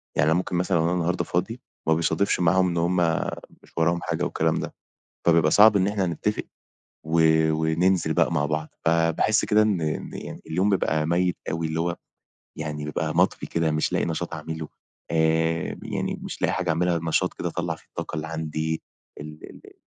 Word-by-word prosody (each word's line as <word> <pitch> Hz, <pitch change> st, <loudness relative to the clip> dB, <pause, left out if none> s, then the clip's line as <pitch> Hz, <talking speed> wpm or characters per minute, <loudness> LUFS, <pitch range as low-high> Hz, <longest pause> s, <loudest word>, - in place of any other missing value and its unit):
يعني 80 Hz, +2 st, +3 dB
أنا 85 Hz, -, +3 dB
ممكن 90 Hz, -1 st, -2 dB
مثلًا 90 Hz, -1 st, +1 dB
أنا 85 Hz, +2 st, +1 dB
النهارده 90 Hz, 0 st, 0 dB
فاضي، -, -, -2 dB, 0.3 s
ما 80 Hz, -, +5 dB
بيصادفش 85 Hz, +4 st, +1 dB
معاهُم 90 Hz, +2 st, +3 dB
إن 85 Hz, -, -2 dB
هُم 85 Hz, +2 st, +1 dB, 0.7 s
مش -, -, -21 dB
وراهم 85 Hz, +1 st, +2 dB
حاجة -, -, -2 dB
والكلام -, -, 0 dB
ده. -, -, -5 dB, 0.5 s
فبيبقى 80 Hz, -2 st, +5 dB
صعب 105 Hz, +1 st, +7 dB
إن 95 Hz, +1 st, +2 dB
إحنا 100 Hz, -2 st, 0 dB
نتَّفِق 105 Hz, +6 st, -2 dB, 0.6 s
و 80 Hz, +1 st, +2 dB, 0.3 s
وننزِل 80 Hz, +1 st, +1 dB
بقى 85 Hz, -, +2 dB
مع 75 Hz, -2 st, +1 dB
بعض. 75 Hz, 0 st, -2 dB, 0.2 s
فباحِس 85 Hz, +6 st, +2 dB
كده 105 Hz, 0 st, +4 dB
إن 105 Hz, -5 st, +1 dB
إن 75 Hz, -1 st, -4 dB
اليوم 95 Hz, +6 st, +1 dB
بيبقى 80 Hz, -5 st, +1 dB
ميِّت 90 Hz, +1 st, +1 dB
أوي، 80 Hz, 0 st, -1 dB
اللي 80 Hz, +1 st, -2 dB
هو 85 Hz, 0 st, -1 dB, 0.6 s
يعني 75 Hz, -1 st, -4 dB
بيبقى 75 Hz, -, -2 dB
مطفِي -, -, +2 dB
كده، 80 Hz, -2 st, 0 dB
مش 75 Hz, 0 st, 0 dB
لاقِي -, -, +1 dB
نشاط 85 Hz, +1 st, -3 dB
أعمله. 80 Hz, 0 st, -5 dB, 0.4 s
آآ 80 Hz, 0 st, +1 dB
يعني، -, -, -3 dB
مش -, -, -7 dB
لاقِي -, -, +2 dB
حاجة 90 Hz, -2 st, -2 dB
أعمَلها، 85 Hz, +1 st, +1 dB
نشاط 80 Hz, -1 st, +1 dB
كده -, -, -3 dB
أطلِّع -, -, -3 dB
فيه -, -, -22 dB
الطاقة -, -, -6 dB
اللي 80 Hz, +1 st, -3 dB
عندي، 80 Hz, 0 st, -3 dB, 0.4 s
ال 75 Hz, +1 st, -9 dB
اللي -, -, -15 dB
80 Hz, 180 wpm, -25 LUFS, 80-90 Hz, 0.7 s, صعب